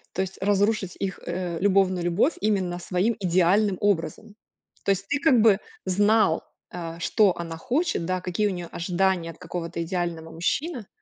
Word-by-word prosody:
То 190 Hz, -, 0 dB
есть 190 Hz, 0 st, -4 dB
разрушить 205 Hz, -1 st, +1 dB
их, 195 Hz, -1 st, -3 dB
э, 175 Hz, -1 st, -3 dB
любовную 190 Hz, -2 st, +2 dB
любовь 180 Hz, -, +2 dB
именно 190 Hz, -4 st, 0 dB
своим 185 Hz, +6 st, 0 dB
идеальным 185 Hz, +2 st, +2 dB
образом. 205 Hz, +2 st, -1 dB, 0.5 s
То -, -, +3 dB
есть 195 Hz, 0 st, -1 dB
ты 285 Hz, -, +1 dB
как 270 Hz, -6 st, +4 dB
бы 215 Hz, -2 st, +5 dB, 0.3 s
знал, 205 Hz, -2 st, +3 dB, 0.3 s
э, 170 Hz, -1 st, -6 dB
что 200 Hz, +2 st, +3 dB
она 165 Hz, -1 st, -5 dB
хочет, 255 Hz, -, -1 dB
да, 185 Hz, +1 st, -1 dB
какие 185 Hz, +4 st, 0 dB
у -, -, -1 dB
неё 175 Hz, -2 st, -6 dB
ожидания 175 Hz, -1 st, 0 dB
от 165 Hz, -, -17 dB
какого-то 170 Hz, -1 st, -5 dB
идеального 170 Hz, -2 st, -3 dB
мужчины. 235 Hz, -, -2 dB
185 Hz, 165 wpm, -25 LUFS, 175-205 Hz, 0.5 s, бы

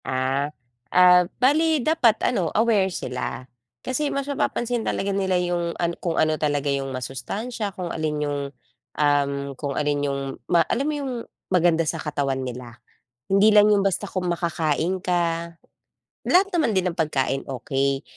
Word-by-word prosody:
Ah. 130 Hz, +2 st, 0 dB, 0.4 s
Ah, 180 Hz, 0 st, +7 dB, 0.2 s
bale 310 Hz, +4 st, +3 dB
dapat 255 Hz, -9 st, +3 dB
ano, 180 Hz, -10 st, 0 dB
aware 210 Hz, -4 st, +2 dB
sila. 125 Hz, -3 st, -5 dB, 0.3 s
Kasi 270 Hz, -, -2 dB
mas 275 Hz, 0 st, -2 dB
mapapansin 240 Hz, -4 st, -1 dB
talaga 200 Hz, -2 st, -1 dB
nila 190 Hz, -2 st, +1 dB
yung 175 Hz, -1 st, -1 dB
an 170 Hz, 0 st, 0 dB
kung 170 Hz, -2 st, 0 dB
ano 155 Hz, 0 st, +3 dB
talaga 145 Hz, -2 st, -1 dB
yung 135 Hz, -1 st, -1 dB
masustansya, 200 Hz, -, -4 dB
kung 185 Hz, -2 st, -5 dB
alin 155 Hz, -1 st, -2 dB
yung, 145 Hz, 0 st, -2 dB, 0.6 s
um, 145 Hz, -1 st, +3 dB, 0.2 s
kung 140 Hz, +2 st, -4 dB
alin 145 Hz, -1 st, 0 dB
yung 140 Hz, -1 st, -1 dB, 0.3 s
ma 170 Hz, -2 st, +5 dB
alam 255 Hz, -, 0 dB
mo -, -, -1 dB
yung 275 Hz, -2 st, -3 dB, 0.4 s
maganda 170 Hz, -3 st, +2 dB
sa 165 Hz, -, -1 dB
katawan 140 Hz, -3 st, -2 dB
nila. 125 Hz, -2 st, -7 dB, 0.6 s
Hindi 200 Hz, +2 st, +6 dB
lang 210 Hz, 0 st, +7 dB
yung 205 Hz, -1 st, +4 dB
basta 195 Hz, +1 st, 0 dB
kung 185 Hz, -1 st, -3 dB
makakain 170 Hz, +1 st, -1 dB
ka. 170 Hz, -1 st, -1 dB, 0.7 s
Lahat 375 Hz, +3 st, +5 dB
naman 305 Hz, -, +1 dB
din 185 Hz, -1 st, +1 dB
ng 170 Hz, -, -14 dB
pagkain 135 Hz, -3 st, 0 dB
okey, 135 Hz, +1 st, -1 dB
170 Hz, 155 wpm, -23 LUFS, 145-205 Hz, 0.7 s, Ah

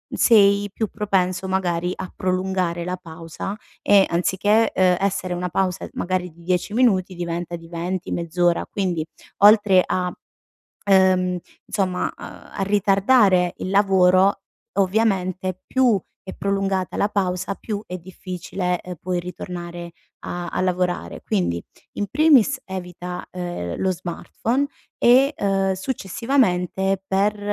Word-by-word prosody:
sei 205 Hz, -2 st, +5 dB
più 220 Hz, +1 st, -2 dB
propenso 190 Hz, -3 st, -1 dB
magari 180 Hz, -2 st, 0 dB
a 185 Hz, -, -7 dB
prolungare 185 Hz, -2 st, -1 dB
la 180 Hz, 0 st, -2 dB
pausa 165 Hz, +3 st, -7 dB, 0.2 s
e, 200 Hz, -1 st, +5 dB
anziché, 200 Hz, +6 st, +2 dB
uhm, 180 Hz, -1 st, +4 dB
essere 190 Hz, -2 st, -1 dB
una 180 Hz, 0 st, -3 dB
pausa 185 Hz, 0 st, -1 dB
magari 180 Hz, 0 st, -2 dB
di 170 Hz, +2 st, -18 dB
10 180 Hz, +3 st, -1 dB
minuti, 195 Hz, -7 st, +2 dB
diventa 175 Hz, 0 st, -4 dB
di 165 Hz, -1 st, -11 dB
20, 175 Hz, +2 st, -4 dB
mezz'ora, 175 Hz, 0 st, 0 dB
quindi 180 Hz, -5 st, -1 dB, 0.3 s
oltre 205 Hz, -2 st, +6 dB
a 180 Hz, -1 st, -2 dB, 0.8 s
uhm, 185 Hz, -1 st, +4 dB, 0.3 s
insomma, 185 Hz, -3 st, -1 dB
a -, -, -12 dB
a 195 Hz, -, -3 dB
ritardare 200 Hz, -1 st, +3 dB
il 185 Hz, -, -4 dB
lavoro, 195 Hz, -1 st, +4 dB, 0.3 s
ovviamente, 185 Hz, -2 st, 0 dB
più 250 Hz, -6 st, +3 dB, 0.2 s
è 190 Hz, -, -8 dB
prolungata 195 Hz, -1 st, -1 dB
la 205 Hz, -, +2 dB
pausa 190 Hz, -1 st, -1 dB
più 205 Hz, 0 st, -5 dB
è 180 Hz, -, -5 dB
difficile, 180 Hz, 0 st, -4 dB
uhm, 180 Hz, -1 st, -7 dB
poi 180 Hz, 0 st, -2 dB
ritornare 175 Hz, -1 st, -7 dB, 0.4 s
a 175 Hz, 0 st, -4 dB
a -, -, -2 dB
lavorare. 180 Hz, -, -1 dB
Quindi, 85 Hz, -1 st, -1 dB, 0.4 s
in 205 Hz, -, 0 dB
primis, 275 Hz, -4 st, +4 dB
evita, 180 Hz, -1 st, -6 dB
ehm, 175 Hz, -, -4 dB
lo 190 Hz, -, 0 dB
smartphone 205 Hz, +9 st, -2 dB, 0.3 s
e, 265 Hz, +4 st, +5 dB
uhm, 195 Hz, -1 st, +1 dB
successivamente, 195 Hz, -3 st, 0 dB
per, 200 Hz, +2 st, +1 dB
185 Hz, 125 wpm, -22 LUFS, 180-200 Hz, 0.8 s, oltre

